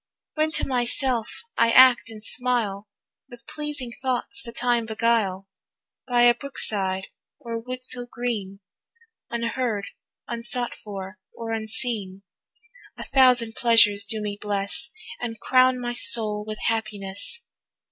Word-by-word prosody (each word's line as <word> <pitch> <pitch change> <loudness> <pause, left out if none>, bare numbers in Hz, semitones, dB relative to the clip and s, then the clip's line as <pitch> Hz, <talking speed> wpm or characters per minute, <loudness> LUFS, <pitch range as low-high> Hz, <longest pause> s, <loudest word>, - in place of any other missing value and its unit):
When 310 0 0
to - - 0
myself 245 - -1 0.2
I 230 - +5
act 255 -1 +6
and 215 -1 -10
smile, 220 -5 0 0.4
With 245 -1 -14
pleasing 295 -5 -5
thoughts 255 0 -3
the 235 - -9
time 240 -1 0
beguile, 220 -4 0 0.6
By 245 -1 +3
a 240 0 +7
brook 280 +3 -10
side 190 -2 0 0.3
or 230 -1 -5
wood 255 +2 -7
so 245 -1 +1
green, 215 -6 -4 0.7
Unheard, 230 -3 -2 0.4
unsought 235 +1 -3
for, 195 -1 -8 0.2
or 230 -1 -6
unseen, 220 -3 -3 0.7
A - - -6
thousand 250 -4 +4
pleasures 210 -4 +4
do 220 0 -1
me 205 -1 -4
bless, 205 +10 -2 0.3
And 225 -2 -5
crown 255 0 +4
my 240 0 -3
soul 220 -3 +5
with 215 0 -5
happiness. 210 - -2
230 Hz, 125 wpm, -24 LUFS, 210-245 Hz, 0.7 s, a